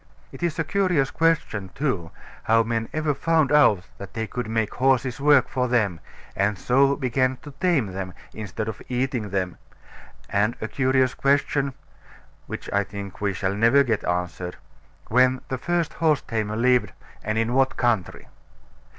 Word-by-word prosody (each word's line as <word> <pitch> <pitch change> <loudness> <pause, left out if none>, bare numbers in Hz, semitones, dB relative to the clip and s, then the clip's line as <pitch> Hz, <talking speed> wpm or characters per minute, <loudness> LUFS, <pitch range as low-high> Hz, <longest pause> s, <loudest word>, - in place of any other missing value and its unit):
It - - -11
is 170 -2 -1
a 160 - +1
curious 180 -8 +1
question, 155 -12 0
too, 115 - -1 0.4
how 115 +1 +4
men 115 0 -2
ever 155 -1 0
found 160 0 +1
out 110 -11 +5
that 100 0 -9
they 110 0 -1
could 120 0 -5
make 110 -1 -1
horses 130 -1 +1
work 145 -2 +5
for 130 -2 -1
them, 110 -9 +1 0.4
and 100 +1 +1
so 135 +6 +3
began 130 -1 0
to 145 - -9
tame 175 -10 +3
them, 95 -1 -5 0.2
instead 110 0 -5
of 110 - -5
eating 125 -3 -1
them, 95 -2 -2 0.7
and 105 +4 +1
a 110 - -3
curious 130 +2 +2
question 140 -1 +1 0.7
(which - - -6
I 100 0 +3
think 100 -1 -8
we 100 -1 +1
shall 95 0 -1
never 115 +7 +4
get 115 -5 -1
answered) 90 0 -3 0.5
when 130 +2 +3
the 130 - -3
first 175 +1 -1
horse 155 -3 +2
tamer 110 -2 -2
lived, 120 -2 +2 0.3
and 110 +1 -1
in 115 +2 0
what 130 0 +2
country. 115 -7 0
120 Hz, 160 wpm, -24 LUFS, 105-140 Hz, 0.7 s, out